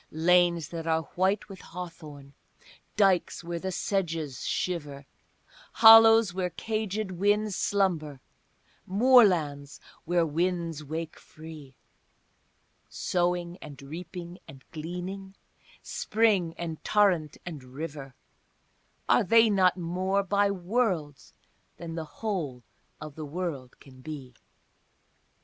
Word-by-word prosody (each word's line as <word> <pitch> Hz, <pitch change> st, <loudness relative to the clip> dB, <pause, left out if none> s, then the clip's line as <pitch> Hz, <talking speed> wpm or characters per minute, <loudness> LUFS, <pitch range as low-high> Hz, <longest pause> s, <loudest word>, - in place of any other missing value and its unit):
Lanes 170 Hz, 0 st, +2 dB
that 165 Hz, -1 st, -6 dB
are 160 Hz, 0 st, +1 dB
white 190 Hz, +3 st, 0 dB
with 195 Hz, -2 st, -11 dB
hawthorn, 155 Hz, -5 st, -10 dB, 0.6 s
dykes 195 Hz, -4 st, +2 dB
where 170 Hz, 0 st, -4 dB
the 190 Hz, +2 st, -4 dB
sedges 165 Hz, -, -2 dB
shiver, 145 Hz, -6 st, -3 dB, 0.7 s
Hollows 225 Hz, -3 st, +8 dB
where 180 Hz, -1 st, -2 dB
caged 215 Hz, +2 st, -3 dB
winds 205 Hz, +2 st, +1 dB
slumber, 170 Hz, -10 st, 0 dB, 0.7 s
moorlands 185 Hz, -, +3 dB, 0.3 s
where 175 Hz, 0 st, +2 dB
winds 165 Hz, 0 st, -2 dB
wake 160 Hz, +2 st, -6 dB
free, 155 Hz, -4 st, -12 dB, 1.1 s
Sowing 175 Hz, 0 st, -1 dB
and 145 Hz, -3 st, -10 dB
reaping 170 Hz, +4 st, -8 dB
and 135 Hz, -1 st, -13 dB
gleaning, 180 Hz, +4 st, -7 dB, 0.5 s
spring 205 Hz, -7 st, +1 dB
and 165 Hz, -2 st, -6 dB
torrent 185 Hz, -8 st, +2 dB
and 155 Hz, -6 st, -7 dB
river, 135 Hz, 0 st, -8 dB, 0.9 s
Are -, -, +4 dB
they 225 Hz, +3 st, +5 dB
not 185 Hz, -2 st, +3 dB
more, 185 Hz, +3 st, -1 dB
by 200 Hz, +1 st, +2 dB
worlds, 185 Hz, -, -2 dB, 0.5 s
than 170 Hz, -1 st, -7 dB
the 165 Hz, -1 st, -4 dB
whole 155 Hz, -, -4 dB, 0.4 s
of 150 Hz, -1 st, -8 dB
the 155 Hz, +1 st, -7 dB
world 145 Hz, -5 st, -5 dB
can 130 Hz, -2 st, -16 dB
be? 140 Hz, -4 st, -8 dB
175 Hz, 105 wpm, -28 LUFS, 155-195 Hz, 1.1 s, Hollows